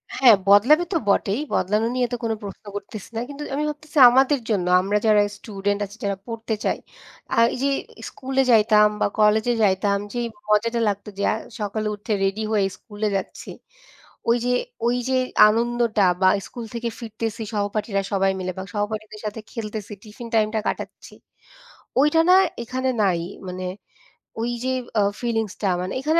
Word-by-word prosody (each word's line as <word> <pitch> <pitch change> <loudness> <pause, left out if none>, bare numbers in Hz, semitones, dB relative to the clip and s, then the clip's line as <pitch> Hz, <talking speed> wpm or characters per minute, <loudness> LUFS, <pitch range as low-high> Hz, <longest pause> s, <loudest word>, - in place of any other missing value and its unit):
হ্যাঁ, 245 -5 +7
বদলাবে 240 - +6
তো - - +3
বটেই! 200 +2 +2
বদলানো 210 +4 +1
নিয়ে 250 -1 +1
তো - - 0
কোনো 225 -1 0
প্রশ্ন 200 +1 -9
করতেছি 205 0 -7
না। - - -1
কিন্তু 285 +1 -7
আমি 295 - -1
ভাবতেছি, 300 +1 -8
আমাদের 265 +3 +3
জন্য, 190 -5 0
আমরা 200 +3 0
যারা 210 -1 +5 0.2
স্টুডেন্ট 205 -1 -3
আছি, 200 +2 -13
যারা 200 -1 -1
পড়তে 225 -1 -4
চাই, - - +1 0.6
আ - - +1 0.2
এই - - -4
যে 280 - +3 0.4
স্কুলে 265 0 -1
যাইতাম 215 -1 +6
বা - - +4
কলেজে 215 +3 +4
যাইতাম, 200 0 +2 0.2
যেই 240 -1 -1 0.2
মজাটা 230 +3 +2
লাগতো 205 +1 -4
যে, 200 - -2
আ - - +1 0.3
সকালে 215 +1 -2
উঠে 210 +2 -3
রেডি 195 +2 0
হয়ে 205 -3 +2
স্কুলে 210 -1 -4
যাচ্ছি। 195 - -5 0.8
ওই 235 - +4
যে, 250 - +1 0.4
ওই 245 - +2
যে, 260 - +2 0.3
আনন্দটা 230 -1 +1 0.2
বা 185 - +6 0.2
স্কুল 240 -2 -8
থেকে 235 0 -2
ফিরতেছি 225 0 -4
সহপাঠীরা 205 0 -1
সবাই 195 0 +2
মিলে 185 0 -3
বা 190 - -4
সহপাঠীদের 215 0 -4
সাথে 210 +1 -4
খেলতেছি 215 -2 -6
টিফিন 225 +2 -10
টাইমটা 220 0 +2
কাটাচ্ছি, - - -5 0.9
ওইটা 300 +3 +4
না - - +8 0.3
এখানে 260 +2 -2
নাই। 185 -4 +2 0.3
মানে, 185 0 -5 0.8
ওই 235 +1 -1
যে 260 - +1 0.3
আ - - +4 0.2
ফিলিংসটা 225 -4 -1
মানে 185 +1 -4
এখানে 315 +4 +2
215 Hz, 165 wpm, -23 LUFS, 205-240 Hz, 0.9 s, না